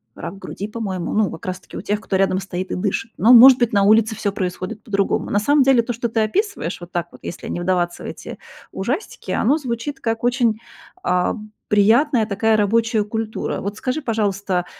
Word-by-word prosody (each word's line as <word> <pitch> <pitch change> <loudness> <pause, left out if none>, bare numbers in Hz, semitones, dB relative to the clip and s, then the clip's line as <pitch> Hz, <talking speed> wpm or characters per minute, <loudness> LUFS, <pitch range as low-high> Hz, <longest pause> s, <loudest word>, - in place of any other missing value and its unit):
рак 195 - -7
груди, 200 +2 -6
по-моему, 200 -5 -4
ну, 210 -4 +1
как 165 - -9
раз 185 0 -4
таки - - -11
у - - -5
тех, 210 +1 -2
кто 195 -3 -1
рядом 190 -1 +2
стоит 185 -1 -5
и - - -1
дышит. 205 +4 -2
Но, 230 - +5
может 250 +2 +10
быть, 240 -2 +2
на 200 -1 +3
улице 220 +2 +4
всё 200 -2 -2
происходит 185 +2 -4
по-другому. 200 -3 -1
На 205 - +3
самом 285 +6 +3
деле 260 -3 +5
то, 240 +1 -4
что 235 0 -3
ты 225 - -1
описываешь 215 - -2
вот 175 - -10
так 175 -1 -2
вот, - - -15
если - - -7
не 175 - -4
вдаваться 175 -1 -1
в - - -6
эти - - -8 0.4
ужастики, 260 - -4
оно 270 +7 +2
звучит 270 0 -4
как 225 0 -2
очень, 240 -3 +1 0.4
а, 180 0 +1 0.3
приятная 225 +5 +4
такая 220 +1 +1
рабочая 220 +1 +2
культура. 220 0 -3
Вот 200 +2 -5
скажи, 260 +5 -2
пожалуйста, 200 -6 -1
215 Hz, 205 wpm, -20 LUFS, 195-235 Hz, 0.4 s, может